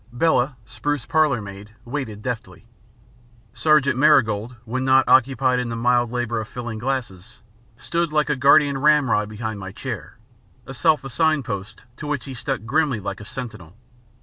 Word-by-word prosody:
Bella, 135 0 +1
spruce 125 +4 -3
parlour 140 -4 +2
maid, 100 +2 -11
waited 120 -5 -5
deftly. 120 -2 -5 0.9
Sergeant 140 -5 +3
Marigold, 120 -6 +3
when 130 +3 -2
not 130 0 +4
occupied 130 0 +3
in 125 -1 -2
the 115 - -3
mild 120 0 +2
labour 120 -2 -2
of 110 - -7
filling 120 -3 -6
glasses, 120 -5 -4 0.4
stood 170 +4 -2
like 150 -2 +2
a 150 - +1
guardian 140 +1 +4
ramrod 135 -8 +3
behind 110 -1 -5
my 95 -1 -7
chair 110 - -7 0.5
a 135 - -8
self 155 +3 +2
assigned 155 +1 +1
post 105 -1 -6
to 150 - -7
which 145 -3 -2
he 135 - -7
stuck 125 -2 -4
grimly 140 -1 +1
like 100 0 -5
a - - -9
sentinel. 110 -7 -8
125 Hz, 160 wpm, -22 LUFS, 110-140 Hz, 0.9 s, not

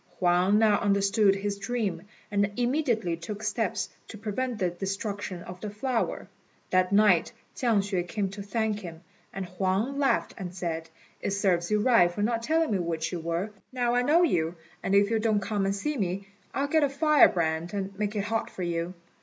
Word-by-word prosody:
Huang 180 +3 +3
now 215 -2 +4
understood 200 0 +3
his 200 0 -3
dream, 205 -7 -2 0.3
and 205 0 +1
immediately 240 - +1
took 205 +6 -7
steps 210 -1 -1 0.2
to 220 - -9
prevent 225 +3 -3
the 180 -4 0
destruction 195 -1 -4
of 180 0 -10
the 210 - -4
flower. 230 +3 -2 0.4
That 185 0 +3
night 200 -4 +4 0.2
Chiang 230 -5 +2
hsüeh 190 -3 -2
came 200 +2 -1
to 200 +2 -7
thank 215 +1 -1
him, 170 -5 -9 0.3
and 195 -1 -4
Huang 190 +9 -1
laughed 275 -2 +1
and 180 -2 -6
said, 165 -2 -3 0.3
"It 195 - -1
serves 180 -4 +1
you 210 0 +2
right 225 -7 +5
for 205 +4 -2
not 230 +1 0
telling 320 +2 +1
me 200 - +1
which 165 -2 -2
you 175 - -3
were. 170 +5 -2 0.2
Now 245 -2 0
I 245 - +3
know 305 +7 +4
you, 170 - +1 0.3
and 195 - +1
if 200 +2 +4
you 225 - +2
don't 215 -1 +2
come 200 -1 -1
and 195 - 0
see 300 +9 -2
me, 195 -1 -2 0.2
I'll 275 - 0
get 315 +2 +3
a 285 - +3
firebrand 175 - +3
and 195 0 -3
make 210 0 -1
it 205 - 0
hot 225 +1 -1
for 185 - -6
you." 170 +1 -2
200 Hz, 195 wpm, -28 LUFS, 180-225 Hz, 0.4 s, right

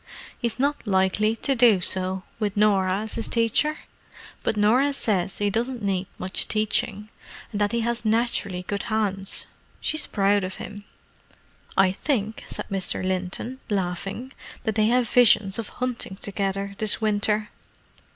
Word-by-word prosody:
"He's 235 -3 -2
not 280 -2 0
likely 200 +3 +2
to 275 +4 0
do 230 -6 +5
so, 185 +1 0 0.2
with 205 -2 -1
Norah 195 -2 +3
as 220 0 -4
his 230 - -1
teacher. 235 +7 +1 0.6
But 215 - -1
Norah 250 +7 +4
says 195 -8 -1
he 205 -1 0
doesn't 235 +2 -1
need 190 -2 0
much 185 +1 0
teaching, 215 -1 0 0.4
and 210 -2 -3
that 205 - +2
he 235 0 0
has 235 0 -1
naturally 215 -5 0
good 200 +2 -3
hands. 195 -3 -1 0.3
She's 310 - -1
proud 200 0 +2
of 185 0 -4
him. 205 0 -8 0.9
I 190 -1 +5
think," 220 0 -2
said - - -4
Mr. 190 -1 +1
Linton, 190 +7 -2
laughing, 195 +6 -3 0.3
"that 220 -3 0
they 215 0 +3
have 245 +1 +3
visions 215 -4 +5
of 225 - -4
hunting 250 -6 -3
together 200 0 -2
this 215 -1 +2
winter!" 210 0 +1
210 Hz, 150 wpm, -25 LUFS, 195-230 Hz, 0.9 s, do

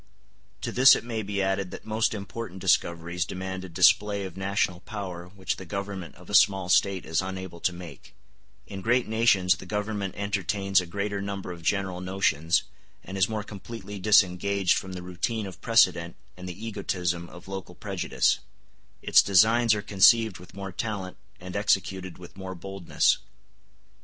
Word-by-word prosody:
To - - -3
this 130 +1 +7
it - - -4
may 115 -2 -3
be 100 -1 -2
added 95 0 -1
that - - -10
most 110 0 0
important 100 -1 -7
discoveries 85 -1 +1
demand 95 0 -5
a 95 - -8
display 100 +4 +3
of 95 - -8
national 95 -1 -1
power 90 -2 -7
which 95 0 -4
the - - -8
Government 100 -3 -5
of 90 +2 -16
a - - -8
small 95 -3 +4
State 95 0 +3
is 80 +2 0
unable 95 -2 -6
to 90 - +1
make; 85 -1 -11 0.5
in 95 -1 -7
great 120 +4 +2
nations 105 -5 +3
the 95 - -11
Government 105 -1 -3
entertains 100 -1 +1
a 90 - -8
greater 100 +2 -3
number 100 -2 -5
of 85 -1 -9
general 95 +1 -1
notions, 90 -4 +1 0.4
and 95 - -8
is 95 +1 +2
more 110 -1 -3
completely 105 0 -8
disengaged 95 -1 +3
from 95 -1 -4
the 90 -1 -7
routine 95 +5 -3
of 95 -2 -10
precedent 90 -7 +3 0.2
and 90 0 -8
the 100 +5 -7
egotism 90 -5 -2
of 90 +1 -13
local 95 -2 -7
prejudice; 95 -3 0 0.6
its - - +6
designs 110 +4 +4
are 105 - -4
conceived 110 +1 +4
with 90 +1 -14
more 100 -1 -6
talent, 95 -2 -4 0.2
and 90 +1 -8
executed 95 -3 0
with 90 -1 -13
more 95 -1 -6
boldness. 95 0 0
95 Hz, 165 wpm, -27 LUFS, 90-100 Hz, 0.6 s, this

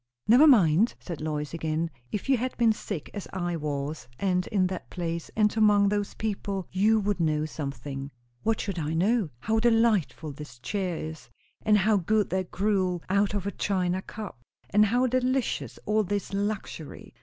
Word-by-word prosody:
"Never 255 +8 +7
mind!" 205 - +5
said 170 -5 -7
Lois 150 -1 -3
again. 160 0 -1 0.2
"If 210 - -3
you 270 - +5
had 255 +2 -3
been 230 -2 +4
sick 200 -6 -6
as 205 - -6
I 175 -2 -1
was, 145 -3 -3
and 180 0 0
in 195 -4 +2
that 185 0 -4
place, 170 -2 -4
and 210 -1 +3
among 210 -2 +5
those 205 0 -1
people, 200 -3 -3
you 215 +4 +3
would 205 -1 -1
know 155 -2 +1
something." 140 -2 -5 0.3
"What 225 0 +1
should 195 -4 -3
I 155 +1 -2
know?" 200 +2 +2
"How 220 +1 +1
delightful 225 -9 +2
this 140 -3 -10
chair 180 - -2
is; 160 0 -7 0.3
and 215 -1 +4
how 210 +2 +3
good 210 +3 +1
that 185 -1 -1
gruel, 185 -3 0
out 200 +1 +2
of 200 -2 -2
a 200 - -1
china 185 -2 0
cup; 200 - -8 0.3
and 210 +1 +5
how 245 +4 +2
delicious 255 0 0
all 215 +1 +2
this 200 0 -3
luxury! 200 -6 -4
195 Hz, 175 wpm, -27 LUFS, 165-215 Hz, 0.3 s, Never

